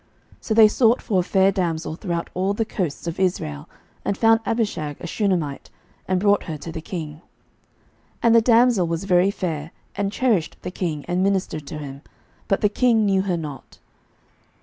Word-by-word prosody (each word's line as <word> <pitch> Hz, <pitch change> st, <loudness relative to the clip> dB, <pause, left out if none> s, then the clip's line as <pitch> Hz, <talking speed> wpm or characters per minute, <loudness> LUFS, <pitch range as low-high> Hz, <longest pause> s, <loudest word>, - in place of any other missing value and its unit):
11:001:003 -, -, -24 dB
So 220 Hz, -, -2 dB
they 220 Hz, -1 st, +8 dB
sought 230 Hz, +2 st, +3 dB
for 195 Hz, -5 st, 0 dB
a -, -, +1 dB
fair 190 Hz, +1 st, +3 dB
damsel 170 Hz, -5 st, -2 dB
throughout 170 Hz, -2 st, -4 dB
all 190 Hz, +2 st, 0 dB
the 225 Hz, -, 0 dB
coasts 175 Hz, -8 st, -3 dB
of 170 Hz, +1 st, -4 dB
Israel, 75 Hz, -, -2 dB, 0.3 s
and 200 Hz, -, -1 dB
found 225 Hz, 0 st, +5 dB
Abishag 205 Hz, -11 st, -1 dB
a -, -, -8 dB
Shunammite, 175 Hz, -7 st, -1 dB, 0.4 s
and 185 Hz, -1 st, +1 dB
brought 205 Hz, +1 st, +2 dB
her 160 Hz, -2 st, -5 dB
to 165 Hz, +3 st, -8 dB
the 160 Hz, -, -6 dB
king. 155 Hz, -3 st, -6 dB
11:001:004 -, -, -22 dB, 1.0 s
And 230 Hz, -1 st, +5 dB
the 230 Hz, -, +7 dB
damsel 230 Hz, -5 st, +4 dB
was 165 Hz, +1 st, -2 dB
very 185 Hz, 0 st, +3 dB
fair, 165 Hz, -6 st, -3 dB, 0.3 s
and 200 Hz, -1 st, -1 dB
cherished 215 Hz, -8 st, 0 dB
the 180 Hz, -, -4 dB
king, 160 Hz, -6 st, -3 dB
and 175 Hz, +1 st, 0 dB
ministered 185 Hz, -6 st, -1 dB
to 160 Hz, -, -6 dB
him: 140 Hz, -2 st, -8 dB, 0.5 s
but 195 Hz, -, +1 dB
the 210 Hz, -, +3 dB
king 225 Hz, -1 st, +2 dB
knew 195 Hz, -1 st, +2 dB
her 185 Hz, -3 st, -1 dB
not. 150 Hz, -4 st, -8 dB
185 Hz, 190 wpm, -22 LUFS, 165-205 Hz, 1.0 s, they